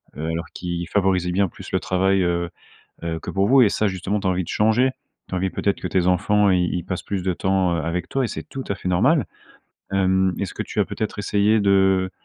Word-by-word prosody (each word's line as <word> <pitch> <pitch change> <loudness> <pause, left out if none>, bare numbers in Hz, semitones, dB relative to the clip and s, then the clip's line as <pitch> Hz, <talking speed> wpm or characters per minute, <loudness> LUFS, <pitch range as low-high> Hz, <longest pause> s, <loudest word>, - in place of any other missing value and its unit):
alors 80 +3 -3
qu'ils 85 -1 -4
favorisaient 95 -3 +1
bien 95 +1 +2
plus - - -11
le - - +1
travail, 95 +1 +1
heu 85 0 0 0.5
heu, 80 -1 -3
que - - -6
pour 100 +1 +1
vous 135 0 +6
et 110 - +6
ça, 110 - 0
justement, 95 +2 -2
tu 95 - -4
as - - +3
envie 90 -1 -1
de - - -13
changer. 110 +5 +2 0.4
Tu - - -5
as - - 0
envie, 95 +1 0
peut-être, 100 - -1
que - - -3
tes 90 -1 +1
enfants, 100 +3 +3
ils 90 -1 +1
ils 90 -1 -3
passent 90 - -4
plus 100 -3 -3
de 95 0 0
temps, 95 -1 +1
heu, 85 - -1
avec 85 +2 -3
toi 135 - 0
et 120 - 0
c'est - - -5
tout 135 -1 -7
à 100 - 0
fait 90 - -5
normal. 125 - +3 0.7
Hem, 95 -1 +2
est-ce 100 - -4
que - - -3
tu - - -7
as - - +4
peut-être 110 -1 -4
essayé 105 +2 +2
de 95 -1 +3
95 Hz, 245 wpm, -22 LUFS, 90-100 Hz, 0.7 s, vous